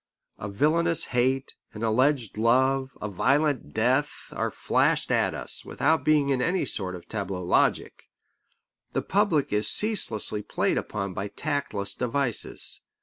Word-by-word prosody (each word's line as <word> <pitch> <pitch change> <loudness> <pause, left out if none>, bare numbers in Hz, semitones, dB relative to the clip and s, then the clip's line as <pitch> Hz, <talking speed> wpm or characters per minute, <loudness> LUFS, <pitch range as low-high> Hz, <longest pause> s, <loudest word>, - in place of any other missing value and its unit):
A 100 - -5
villainous 165 +10 +1
hate, 130 +2 0 0.2
an 105 - -7
alleged 125 +1 +1
love, 130 +4 +1
a 105 - -4
violent 140 - 0
death, 130 +6 0
are - - -1
flashed - - 0
at - - +1
us, - - -1
without 160 0 0
being 150 -2 +2
in 130 -2 +1
any 180 +7 0
sort 95 -3 -3
of 85 -1 -12
tableau 95 -4 -4
logic. 90 - 0 0.8
The - - -1
public 180 - +1
is 105 +1 +6
ceaselessly 115 - +2
played - - -1
upon 100 -2 -5
by 95 +3 -4
tactless 120 -5 -2
devices. 125 -1 -1
130 Hz, 140 wpm, -26 LUFS, 105-145 Hz, 0.8 s, is